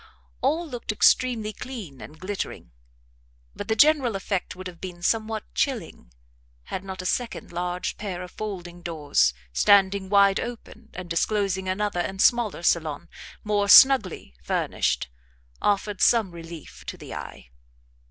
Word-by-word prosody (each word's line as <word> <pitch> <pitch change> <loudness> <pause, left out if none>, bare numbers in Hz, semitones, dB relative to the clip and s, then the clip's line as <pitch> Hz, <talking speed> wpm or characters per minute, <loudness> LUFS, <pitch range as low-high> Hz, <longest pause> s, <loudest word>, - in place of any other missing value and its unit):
All 320 +6 +1
looked 245 -6 -4
extremely 220 0 +2
clean 205 - -8
and 155 +1 -11
glittering, 185 - -5 0.8
but - - -6
the 220 - +1
general 275 -3 +4
effect 195 -1 -3
would 185 0 -9
have 180 -2 -9
been 180 -2 -8
somewhat 220 +1 0
chilling 195 - -3 0.5
had 185 - -6
not 190 -1 -6
a - - -10
second 240 +5 -2
large 175 +1 -3
pair 185 -4 -5
of 180 - -10
folding 180 -5 -7
doors, 150 - +1 0.2
standing 195 - +4
wide 200 -1 +5
open, 230 -1 -8
and 180 0 -6
disclosing 190 +2 0
another 205 -1 -1
and 190 +2 -3
smaller 230 -6 +2
salon, 160 -4 0 0.3
more 205 -1 0
snugly 220 - +6
furnished, 65 - -1 0.5
offered 205 -1 0
some 225 -6 +4
relief 165 -2 -10
to - - -5
the - - -9
eye. - - -9
195 Hz, 140 wpm, -25 LUFS, 175-220 Hz, 0.8 s, snugly